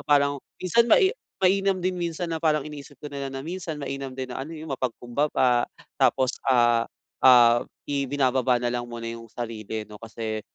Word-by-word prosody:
parang 140 -1 +3 0.2
minsan 230 +6 +2
mai 380 - +5 0.3
mainam 195 +1 +3
din 185 0 0
minsan 170 0 -3
na 160 - -1
parang 155 -3 +2
iniisip 145 -1 -9
ko 150 - -5
na 140 -1 -4
lang - - -9
na 135 - -5
minsan 170 -1 -4
mainam 135 -2 -5
din 130 -1 -5
na - - -4
ano 155 +5 -6
'yung 155 -2 -6
mapagkumbaba 125 0 0 0.3
tapos, 130 -1 +3 0.2
ah 120 -2 +4 0.3
ah 120 -2 +7 0.2
ibinababa 135 -2 +1
nalang 120 0 -2
muna 115 -1 -7
'yung 115 0 -8
sarili 110 -2 -5
ano 105 0 -13
kasi 110 -1 -4
135 Hz, 170 wpm, -25 LUFS, 120-155 Hz, 0.3 s, ah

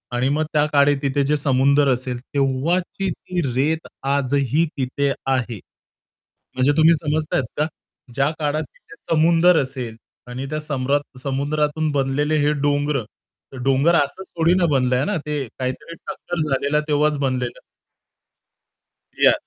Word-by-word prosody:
आणि 125 +2 +1
मग 150 +2 +1
त्या 150 -1 +3
काळी 145 0 +5
तिथे 140 0 +1
जे 150 +2 +2
समुद्र 140 0 +3
असेल 125 0 -4
तेव्हाची 155 +8 0
ती 180 -1 -4
रेत 155 +6 0 0.2
आजही 140 +2 +1
तिथे 140 +1 0
आहे. 125 -5 -1 1.0
म्हणजे 130 +2 +3
तुम्ही 160 +1 +6
समजताहेत 155 -2 -1
का? 150 - +2 0.5
ज्या 135 +3 +2
काळात 150 +1 0
तिथे - - -17 0.2
समुद्र 165 +1 +5
असेल 130 -4 -5 0.3
आणि 125 +2 -5
त्या 155 - -2
समरत 145 -2 -2
समुद्रातून 150 +3 0
बनलेले 145 +2 +1
हे 145 +1 +3
डोंगर. 145 -1 +1 0.6
डोंगर 135 +6 +3
असंच 170 +6 0
थोडी 165 +1 +4
ना 185 -2 +3
बनलंय 130 0 +2
ना 205 -3 0
ते 150 -2 -2 0.2
काहीतरी 130 +6 -4
टक्कर 175 -2 -4
झालेला 140 +2 +1
तेव्हाच 150 0 +2
बनलेलं. 130 -3 -2 1.6
या - - +6
145 Hz, 135 wpm, -21 LUFS, 135-155 Hz, 1.6 s, तुम्ही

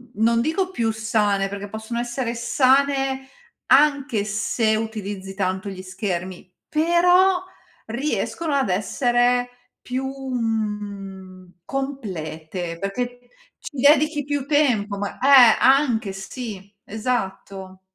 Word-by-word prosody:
non 230 +2 +2
dico 365 +7 -1
più 230 -8 0
sane, 210 -3 0
perché 200 0 -6
possono 220 +3 -5
essere 240 0 -3
sane 265 +2 +2 0.4
anche 275 -5 +4
se 215 +1 0
utilizzi 205 -3 -5
tanto 190 0 -2
gli 185 -1 -7
schermi, 185 -1 -5 0.2
però 355 +3 +4 0.4
riescono 295 +5 -2
ad 270 -6 +1
essere 245 +5 +1 0.3
più, 255 +2 -3
mhmm, 210 -8 -4
complete, 175 - -5
perché 245 +5 -3 0.4
ci 290 - -9
dedichi 295 +1 +4
più 285 -1 -2
tempo 245 -9 +1
ma 200 0 -4
eh, 260 -4 +7
anche, 250 -6 +3
sì, 200 0 -8
esatto. 195 -4 -4
230 Hz, 105 wpm, -22 LUFS, 195-270 Hz, 0.4 s, eh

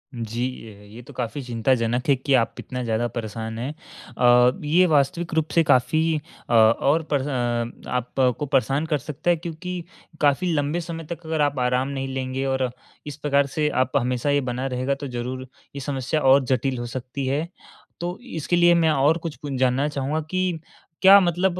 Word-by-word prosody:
जी। 115 +1 -3 0.2
अ, 105 -1 -13
ये 120 - -9
तो - - -14
काफ़ी 125 +3 -4
चिंताजनक 120 0 0
है 140 - +6
कि 135 +2 -1
आप 120 -3 +3
इतना 125 -1 -5
ज़्यादा 115 0 0
परेशान 110 -1 -5
हैं। 130 +5 -3 0.4
अ, 125 0 +6
ये 170 +5 +4
वास्तविक 165 +5 +1
रूप 160 -1 +1
से 165 - +5
काफ़ी 155 +3 +3 0.5
अ, - - 0
और 115 +8 +4
परेश 140 -1 +1
अ, 120 -3 -2
आपको 125 +2 0
परेशान 140 +1 +1
कर 155 -2 0
सकता 150 +5 -4
है 175 - +5
क्योंकि 175 +2 -6 0.4
काफ़ी 150 +5 +2
लंबे 145 +2 0
समय 165 0 -6
तक 170 0 -6
अगर 160 -1 -1
आप 145 -2 +1
आराम 125 +1 +1
नहीं 135 -1 -3
लेंगे 130 0 -3
और 130 -1 0 0.4
इस 145 0 -6
प्रकार 140 -1 +2
से 150 -1 +1
आप 130 - -9
हमेशा 125 +1 0
ये 145 0 +3
बना 125 +2 -3
रहेगा 130 +2 -1
तो 140 0 -6
ज़रूर 130 +1 -5 0.3
ये - - -4
समस्या 140 +2 -2
और 135 0 +5
जटिल 130 +1 0
हो 120 - -4
सकती 130 +3 -5
है। 145 +5 -1 0.5
तो 175 +2 -3 0.2
इसके 160 +2 0
लिए 175 0 +6
मैं 165 -1 +3
और 150 +3 +3
कुछ 165 -3 -4
कुन 140 -3 -5
जानना 130 +3 +2
चाहूँगा 145 +1 -2
कि 185 -2 -1 0.4
क्या 195 +1 +9
मतलब 180 0 +1
135 Hz, 190 wpm, -23 LUFS, 125-155 Hz, 0.5 s, क्या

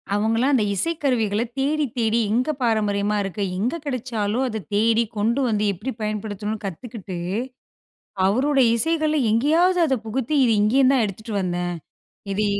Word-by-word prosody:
...அவங்களாம் 225 +6 +1
அந்த 240 - +3
இசைக்கருவிகள 240 - 0 0.2
தேடி 300 +2 +1
தேடி 225 -1 +1
எங்கே 255 +7 +1
பாரம்பரியமா 210 -2 +1
இருக்கு? 195 +1 -3
எங்க 230 - -1
கிடைச்சாலும் 240 -3 -2
அத 220 -3 -4
தேடி 225 +2 +3
கொண்டு 225 +5 +1
வந்து 210 -2 0
எப்படி 210 +9 -5
பயன்படுத்தணும்னு 210 0 -4
கத்துக்கிட்டு, 195 0 -7 1.1
அவரோட 270 +8 +2 0.2
இசைகள் 310 +4 +1 0.2
எங்கேயாவது 325 +10 +3
அத 270 -4 +1
புகுத்தி, 255 +6 -2
இது 230 - +3
இங்கேயும் 255 +5 +4
தான் 250 -4 +3
எடுத்துட்டு 215 +2 -6
வந்தேன். 175 -1 -2 0.6
இது 210 +2 0
225 Hz, 135 wpm, -22 LUFS, 210-265 Hz, 1.1 s, இங்கேயும்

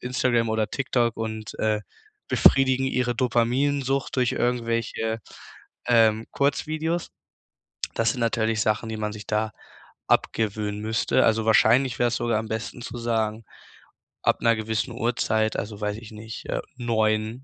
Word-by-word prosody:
Instagram 125 -2 +1
oder 110 -1 +1
TikTok 120 -3 0
und, 110 -1 -5
äh, 110 -1 +1 0.4
befriedigen 135 -1 +4
ihre 125 -2 0
Dopaminsucht 130 +3 +1
durch 125 -2 +2
irgendwelche, 115 -2 -1 0.7
ähm, 115 -2 +4
Kurzvideos. 155 +4 -1 0.9
Das 115 0 +2
sind 125 - -5
natürlich 110 -1 +1
Sachen, 110 +1 0
die 110 - -4
man 105 0 -2
sich 105 0 -9
da 110 0 0 0.6
abgewöhnen 105 -1 0
müsste, 110 +1 +2
also 110 0 +2
wahrscheinlich 120 +3 +4
wär's 120 -1 +2
sogar 120 -2 0
am 110 - -5
besten 110 +2 -5
zu 120 - -6
sagen, 115 -1 -1 0.8
ab - - +2
'ner 115 0 +4
gewissen 110 +3 -2
Uhrzeit 110 -2 0
also, 105 0 -5
weiß 105 0 -1
ich 115 -1 -11
nicht, 110 +1 -8
äh, - - -2 0.2
9:00, 110 0 0
115 Hz, 140 wpm, -25 LUFS, 110-125 Hz, 0.9 s, befriedigen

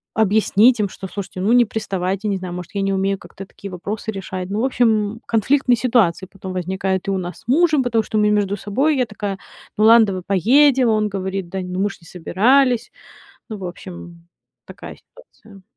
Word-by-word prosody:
объяснить 220 +2 +3
им, 205 -2 0
что: 190 - -8
"Слушайте, 190 -1 -7
ну 210 +5 +2
не 245 -1 +5
приставайте". 195 -2 -3
Не 200 -2 0
знаю, 180 -1 -6
может, 180 +3 -8
я 200 - 0
не 195 0 0
умею 195 +1 0
как-то 195 - -11
такие 200 0 -10
вопросы 205 +5 -5
решать. 190 -2 -6
Ну, 205 - -1
в - - +1
общем, 225 -4 +1
конфликтные 250 +3 +2
ситуации 220 -7 +1
потом 190 -1 -8
возникают 190 +1 -2
и 195 - 0
у 190 - 0
нас 180 -2 -6
с 225 - -24
мужем, 305 +2 +3
потому 230 -3 +1
что 215 0 -3
мы 210 0 +3
между 205 -1 +1
собой. 270 +10 0
Я 250 - +2
такая: 205 -2 -5 0.4
"Ну 215 - +3
ладно, 230 0 +7
давай 185 -2 -3
поедем". 250 - +4
Он 215 -1 +1
говорит: 190 -2 -4
"Да 190 - -4
ну 180 0 -5
мы 205 +1 +1
же - - -11
не 165 - -17
собирались". 235 +9 +2 0.6
Ну, 215 -3 -6
в 190 - -8
общем, 175 -1 -10 0.4
такая - - -11
ситуация. 220 - -19
200 Hz, 200 wpm, -20 LUFS, 190-230 Hz, 0.6 s, ладно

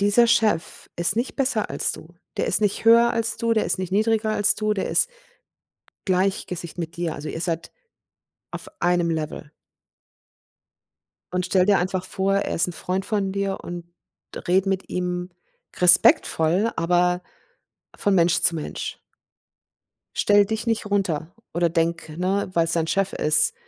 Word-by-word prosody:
Dieser 205 +4 +4
Chef 215 -8 0
ist 175 +4 +3
nicht 240 +3 -2
besser 255 -6 -1
als - - +1
du. 170 +2 -10 0.2
Der - - -1
ist 185 - +2
nicht 205 +1 -1
höher 235 +1 +6
als 230 -1 0
du, 230 0 0
der 220 - +1
ist - - +2
nicht 185 0 -5
niedriger 220 +1 +1
als 205 -1 +5
du, 215 -1 -1
der 195 - -3
ist - - +4 1.0
gleich 190 +1 0
Gesicht 175 -1 -7
mit 165 -1 -6
dir. 170 -2 -3
Also, 150 +2 -7
ihr 165 - -5
seid 165 -2 -3 0.8
auf - - -7
einem 175 -1 +1
Level. 155 -2 -5 1.8
Und 180 0 -1
stell 180 0 +2
dir 205 -1 +3
einfach 185 +1 -2
vor, 195 +1 -1
er 200 - -1
ist 170 - +3
'n 180 - -6
Freund 185 +3 -3
von 200 -3 -2
dir, 195 0 -3
und 175 -1 -7 0.6
rede 190 +2 +2
mit 195 0 -2
ihm 180 0 -3 0.5
respektvoll, 180 +2 +4
aber 180 +1 +1 0.7
von 200 -1 0
Mensch 170 -1 +3
zu 170 - +5
Mensch. 155 - -6 1.2
Stell 205 0 +3
dich 220 +3 -4
nicht 225 -2 -1
runter 180 -5 -2 0.2
oder 170 +1 +1
denk, 165 0 -2
ne, 190 +3 -1
weil's 165 -1 +1
dein 165 -1 0
Chef 195 +2 -1
ist, 155 - +4
185 Hz, 160 wpm, -23 LUFS, 170-205 Hz, 1.8 s, höher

